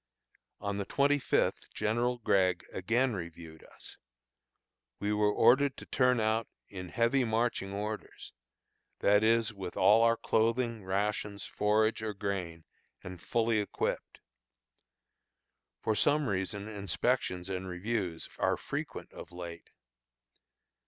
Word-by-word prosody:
On 100 0 -3
the 100 - -2
twenty 145 +4 +2
fifth - - 0
General 120 +3 0
Gregg 95 -5 +2
again 120 +6 +1
reviewed 85 -3 -8
us. - - -13 1.0
We 105 +1 -1
were 105 0 +3
ordered 130 +6 +4
to - - -9
turn 125 -1 +2
out 110 +1 +1 0.2
in 90 -2 -8
"heavy 115 +8 +2
marching 110 -4 0
orders," 105 +2 -5 0.7
that 105 +1 +4
is, 115 0 +3
with 95 -3 -7
all 105 +4 +6
our 115 0 +4
clothing, 115 0 0
rations, 100 +1 -2
forage 110 +2 +1
or 110 -1 -3
grain, 90 -5 -4 0.4
and 90 -2 -8
fully 115 -1 +1
equipped. 105 - -3 1.6
For 110 - +2
some 145 +5 +2
reason 100 +1 -2
inspections 100 -2 -1
and 95 -1 -4
reviews 90 -2 -3
are - - +2
frequent - - -6
of - - -10
late. 85 -1 -8
105 Hz, 120 wpm, -31 LUFS, 95-115 Hz, 1.6 s, all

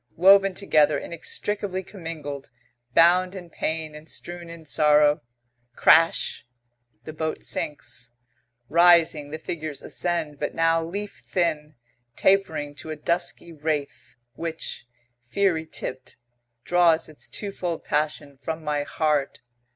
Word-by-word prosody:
Woven 195 +2 +6
together, 155 -6 +3
inextricably 190 +3 -3
commingled, 160 -7 -7 0.5
bound 180 +3 +5
in 175 -3 -9
pain 160 -1 -3
and 150 +1 -11
strewn 175 -1 -6
in 165 -1 -10
sorrow 150 0 +4 0.5
crash! 165 +1 +4 0.6
The 155 - -8
boat 160 0 -3
sinks. 125 -4 -3 0.6
Rising, 165 -2 +5
the 155 - -5
figures 155 -2 -5
ascend, 165 -5 -2
but 150 - -3
now 165 0 +3
leaf 200 +5 -6
thin, 155 -4 -1 0.4
tapering 160 -7 +2
to 160 - -8
a 155 - -3
dusky 170 +2 -2
wraith, 150 -2 -4 0.2
which, 165 -6 -5 0.4
fiery 165 +1 +1
tipped, 130 -4 -7 0.5
draws 175 -1 +3
its 155 - -8
twofold 180 -5 -4
passion 150 -2 -1
from 160 +2 -5
my 150 -1 0
heart. 150 -1 -1
160 Hz, 115 wpm, -25 LUFS, 150-175 Hz, 0.6 s, Woven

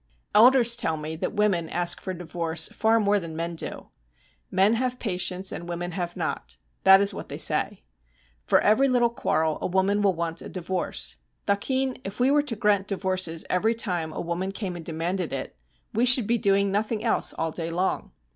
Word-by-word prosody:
Elders 240 +1 +6
tell 160 -9 -1
me 155 +1 -5
that 160 - -4
women 190 -6 +1
ask 175 0 +1
for 190 - -4
divorce 165 -2 -2
far 225 +1 +2
more 205 -1 +2
than 165 -3 -7
men 170 +1 -3
do. - - -5 0.6
'Men 195 +4 +3
have 250 +1 -1
patience, 185 -3 -1
and 170 0 -7
women 175 +1 -4
have 175 0 -4
not,' - - -4 0.3
that 190 0 +8
is 200 0 +2
what - - -8
they - - -5
say. - - 0 0.6
For - - +5
every 260 +7 +3
little 240 -2 +3
quarrel 160 -7 0
a - - -1
woman 190 +3 +1
will 195 -3 +2
want 165 0 -3
a - - -8
divorce. 180 - -2 0.3
'Thakin, 260 +6 -1
if 195 +3 -7
we 255 +2 +3
were 295 0 +4
to 285 -6 -4
grant 205 -2 +1
divorces 185 -4 -1
every 220 +5 +1
time 175 -8 -2
a - - -6
woman 175 +3 -3
came 195 -3 -5
and 170 - -7
demanded 170 +2 -3
it, 135 -1 -5 0.4
we 230 +3 +2
should 250 -2 +7
be 235 +2 +1
doing 200 0 +2
nothing 215 +2 -1
else 230 - +1
all 160 0 -1
day 165 0 -4
long. 180 +3 -2
190 Hz, 195 wpm, -25 LUFS, 170-215 Hz, 0.6 s, that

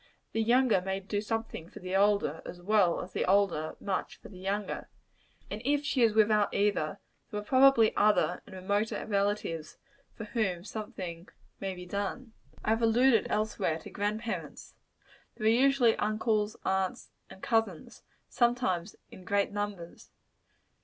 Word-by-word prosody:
The 225 - 0
younger 235 -3 +3
may 190 +1 -2
do 205 +1 -3
something 225 -6 -4
for - - -13
the 185 0 -4
older, 200 -6 +2
as 175 - -8
well 190 -1 +2
as 180 - -11
the - - 0
older 185 -5 +1
much 195 -2 -3
for - - -13
the 185 -3 -12
younger. 200 +2 -3 0.6
And 210 - -4
if 290 +2 +1
she 270 -3 0
is 225 -2 +4
without 215 -1 +4
either, 200 -7 +1 0.3
there 210 - -3
are - - -7
probably 260 -1 +5
other 210 0 +3
and 190 - -11
remoter 200 +4 -1
relatives 200 -6 -1 0.4
for 225 - -7
whom 205 -5 -1
something 185 -5 -7 0.3
may 195 -1 -3
be 180 0 -9
done. 205 +6 -4 0.3
I 215 - +2
have 225 +1 +1
alluded, 230 0 +4
elsewhere, 210 -6 0
to 165 - -11
grand 210 +2 -2
parents 230 - -6 0.6
There 215 - -5
are - - +6
usually 255 -1 +4
uncles, 215 0 0
aunts 190 -1 -1 0.2
and 190 - -14
cousin's 225 -8 -1 0.3
sometimes 235 -7 0 0.2
in 185 - -12
great 200 +2 0
numbers. 205 -4 -5
205 Hz, 155 wpm, -30 LUFS, 190-225 Hz, 0.6 s, are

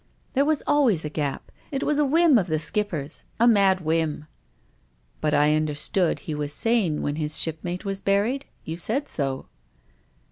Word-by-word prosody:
" - - -39
There 275 +1 +3
was 310 -1 +1
always 250 - +2
a 150 - -4
gap. 145 -3 -3 0.2
It 275 -1 -2
was 300 0 +1
a 295 - +4
whim 310 -2 +5
of 185 - -2
the 155 -2 0
Skipper's 160 -3 -2
— - - -37
a 235 - +5
mad 195 -4 +4
whim." 160 -2 -1 0.5
" - - -39
But 150 -1 +1
I 150 +1 +4
understood 155 +4 0
he 155 - -5
was 150 -1 -3
sane 215 -9 +1
when 145 +1 -2
his 150 -1 -1
ship 160 -1 0
mate 180 +3 -5
was 195 0 -3
buried? 210 +8 0 0.2
You 160 +1 -5
said 240 - -2
so." 135 -3 -2
175 Hz, 190 wpm, -24 LUFS, 150-230 Hz, 0.5 s, whim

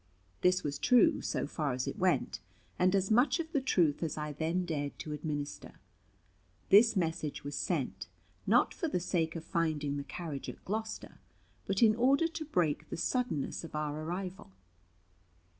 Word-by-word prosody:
This 180 0 +3
was 145 -1 -3
true, 245 - +5
so - - -1
far 145 -1 -2
as 125 0 -2
it - - -4
went, - - +1 0.4
and 185 +2 +4
as 195 +2 +1
much 245 +9 +4
of 325 -1 -4
the 285 - +1
truth 170 - +2
as 160 -3 -2
I 150 -1 -3
then 165 +5 -1
dared 145 -4 -3
to 155 - -6
administer. 150 -1 -4 1.0
This 225 +3 +7
message 165 -5 -2
was 145 - -5
sent, - - -2 0.4
not - - +4
for 335 - -2
the 235 - 0
sake 170 -2 -1
of 165 - -5
finding 155 -5 -1
the 140 - -3
carriage 145 0 -6
at - - -10
Gloucester, 220 +2 -4 0.5
but 195 +3 +2
in 215 -1 +7
order 275 +7 +4
to 320 -1 -6
break 175 - 0
the - - -4
suddenness 230 - -1
of 165 - -8
our 150 0 -2
arrival. 180 - -5
170 Hz, 170 wpm, -32 LUFS, 150-215 Hz, 1.0 s, This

